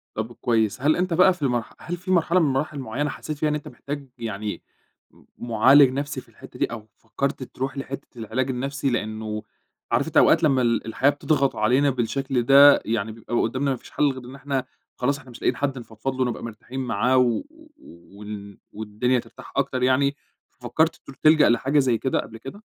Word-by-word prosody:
طَب 110 +2 -4
كويس، 110 -3 0
هل 150 +3 +3
أنت 180 0 0
بقى 185 +2 +5
في 180 - -17
المرح 120 -5 -1
هل 175 +2 -5
في 180 +2 -5
مرحلة 175 0 +3
من 165 - +3
مراحل 145 +2 -2
معيّنة 135 +4 -2
حسّيت 155 0 -6
فيها 155 +1 +1
إن 150 - 0
أنت 150 - -6
محتاج 140 -1 -7
يعني، 105 -2 -4 0.5
م - - -22
معالج 130 +4 +5
نفْسي 140 +2 -3
في - - -23
الحتّة - - -14
دي، - - +3
أو 110 -2 -8
فكّرت 135 +4 -3
تروح 135 +2 -5
لحتّة 135 0 -6
العلاج 120 +4 -2
النفْسي؟ 135 +2 -2
لإنه 110 -2 -3 0.5
عارف - - +2
أنت - - -1
أوقات 165 - +5
لمّا 135 -4 +3
ال 115 -2 +1
الحياة 125 +5 +2
بتضغط 145 -1 +1
علينا 130 +6 +3
بالشكل 130 +1 -1
ده، 140 +3 +7
يعني 110 -1 -1
بيبقى 115 +2 -6
قدّامنا 130 +5 0
ما 130 - -1
فيش - - -16
حل 145 -1 +2
غير 130 -2 -9
إن 130 +2 -10
إحنا 135 -1 -3 0.3
خلاص 140 +3 0
إحنا 130 -3 -16
مش 120 - -13
لاقيين 125 - +1
حد 135 0 -2
نفضفض 115 +3 -5
له 130 0 +1
نبقى 120 - -4
مرتاحين 115 +3 -7
معاه، 125 +1 +1
و 125 -2 +3
و 320 0 -19 0.5
وال 100 -1 -8 0.2
والدنيا 110 +4 0
ترتاح 115 -1 -12
أكتر 135 -2 0
يعني، 140 +2 +3 0.3
ففكّرت 155 +7 0
ت - - -14
تلجأ 155 -1 +6
لحاجة 135 +5 +2
زي 125 -4 +2
كده 130 - 0
قبل 115 - -7
كده؟ 135 - -10
130 Hz, 200 wpm, -24 LUFS, 115-140 Hz, 0.5 s, ده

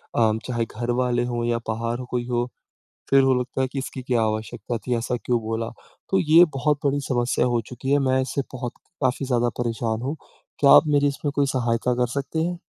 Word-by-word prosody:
अ, 110 -2 +4 0.2
चाहे 120 -2 -1
घर 120 +3 -4
वाले 120 -1 +1
हों 120 0 -1
या 120 0 +1
बाहर 115 +2 -2
ह - - -6
कोई 120 -1 -1
हो 120 -1 0 0.7
फ़िर 135 0 +6
वो 130 -1 +4
लगता 125 +1 -4
है 130 - 0
कि 140 - -3
इसकी 130 -1 -5
क्या 125 -3 +1
आवश्यकता 110 +2 -2
थी 125 - +1
ऐसा 120 +2 -1
क्यों 120 -1 +2
बोला? 115 +1 -3 0.4
तो 190 - +3
ये 165 +1 +7
बहुत 145 +1 +1
बड़ी 140 0 +1
समस्या 120 -1 +1
हो 120 -1 +1
चुकी 130 +2 -5
है 145 - +5
मैं 130 0 +3
इससे 135 +1 -2
बहुत 125 -1 -4 0.3
काफ़ी 130 +1 +1
ज़्यादा 120 -2 +2
परेशान 115 -1 -1
हूँ। 140 +5 -2 0.4
क्या 140 - +6
आप - - +8
मेरी 145 -1 +3
इसमें 140 +1 -3
कोई 140 -1 +3
सहायता 120 -2 0
कर 125 0 +1
सकते 140 +3 -3
हैं? 175 0 -2
125 Hz, 215 wpm, -24 LUFS, 120-135 Hz, 0.7 s, आप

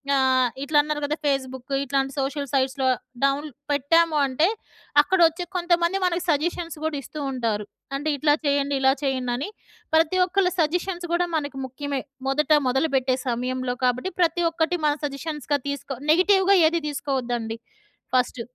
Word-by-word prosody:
ఆహ్, 260 -2 +3
ఇట్ల 295 +2 -4
అన్నారు 300 0 -3
కదా 295 +1 -1
ఫేస్‌బుకు 265 -1 -2
ఇట్లాంటి 270 0 0
సోషల్ 280 +1 -2
సైట్స్‌లో 265 -1 +1 0.4
డౌన్ల్ 275 +2 +1 0.2
పెట్టాము 305 +3 +3
అంటే, 275 +5 +2 0.5
అక్కడ 375 +6 0
వచ్చే 330 +2 -4
కొంతమంది 345 +1 +2
మనకు 360 -1 +1
సజెషన్స్ 330 +2 -1
కూడా 315 -1 -1
ఇస్తూ 300 +3 -9
ఉంటారు. 225 -5 -2 0.3
అంటే 290 +3 -2
ఇట్లా 295 +1 +3
చేయండి. 285 0 +1
ఇలా 265 0 +5
చేయండి 260 -3 -1
అని. 280 +10 -4 0.5
ప్రతి 325 +3 +3
ఒక్కళ్ళ 375 0 +1
సజెషన్స్ 350 +3 0
కూడా 350 +1 +2
మనకు 285 -3 -3
ముఖ్యమే. 275 +1 -4 0.3
మొదట 295 +3 0 0.2
మొదలుపెట్టే 265 -1 +1
సమయంలో 250 +1 -2
కాబట్టి 250 +9 0
ప్రతి 345 0 +2
ఒక్కటి 330 +1 0
మనం 295 0 +1
సజెషన్స్‌గా 290 0 -3
తీసుకో, 280 -1 -4 0.2
నెగెటివ్‌గా 380 +3 +4
ఏది 335 +1 0
తీసుకోవద్దండి. 245 -6 -2 0.6
ఫస్ట్, 250 -1 +1
285 Hz, 140 wpm, -24 LUFS, 265-325 Hz, 0.6 s, ఇలా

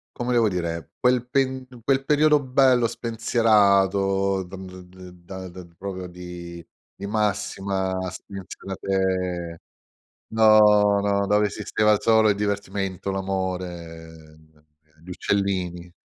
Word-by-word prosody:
Come 125 0 -2
devo 115 -3 +3
dire: 85 -3 -4
quel 125 -1 +2
pen 130 -1 0 0.2
quel 135 +2 +1
periodo 150 +1 +3
bello 130 -2 +3
spensierato, 100 -4 +2
d 90 +1 -10
d 95 0 -11
d 90 0 -13
da 95 +1 -8
da 90 0 -11
proprio 95 -1 -6
di 85 -1 -9 0.3
di 100 - -8
massima 100 -2 -1
spensierate 95 -2 -4 0.7
no, 105 -2 +6
no, 100 0 +1
dove 105 +1 +3
esisteva 105 +1 0
il 105 - +1
solo 110 -1 +4
il - - +2
divertimento, 100 -2 -3
l'amore, 90 -3 -4 0.3
ehm, 80 -1 -25 0.4
gli - - -16
uccellini. 90 -3 -2
100 Hz, 115 wpm, -24 LUFS, 90-110 Hz, 0.7 s, no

